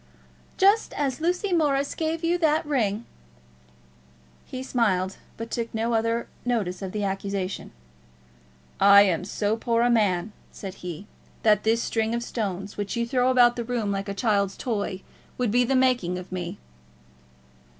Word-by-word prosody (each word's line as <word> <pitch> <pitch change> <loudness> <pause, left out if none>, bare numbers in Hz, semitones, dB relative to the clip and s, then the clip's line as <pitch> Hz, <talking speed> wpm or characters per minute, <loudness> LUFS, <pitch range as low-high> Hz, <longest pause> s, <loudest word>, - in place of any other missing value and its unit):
"Just 405 +3 +4
as 280 0 -2
Lucy 360 +3 0
Morris 285 -4 +1
gave 325 +1 -2
you 345 +1 +1
that 315 -1 +2
ring." 235 -6 0 1.4
He 255 0 -6
smiled, 195 -8 0 0.2
but 230 0 -6
took 230 -1 -2
no 230 +2 0
other 230 +1 0 0.2
notice 210 -7 -1
of 190 -1 -4
the 210 0 -3
accusation. 195 -1 -3 1.1
"I 200 +1 +8
am 185 -3 +1
so 205 +2 -1
poor 230 +1 +1
a 240 - +3
man," 205 -3 +1 0.2
said 195 -2 -7
he, 180 +1 -6 0.4
"that 210 -2 +4
this 225 +1 +2
string 225 0 0
of 235 - -2
stones, 200 -4 -4
which 205 -1 -3
you 235 0 0
throw 250 +1 +2
about 245 -2 +5
the 235 - -3
room 230 -3 -2
like 195 0 -3
a 200 - -3
child's 200 -4 +1
toy, 205 -5 -3 0.3
would 245 -4 0
be 245 +2 +4
the 265 +2 +1
making 250 -9 +2
of 180 +1 -9
me." 180 +1 -4
225 Hz, 160 wpm, -25 LUFS, 200-250 Hz, 1.4 s, I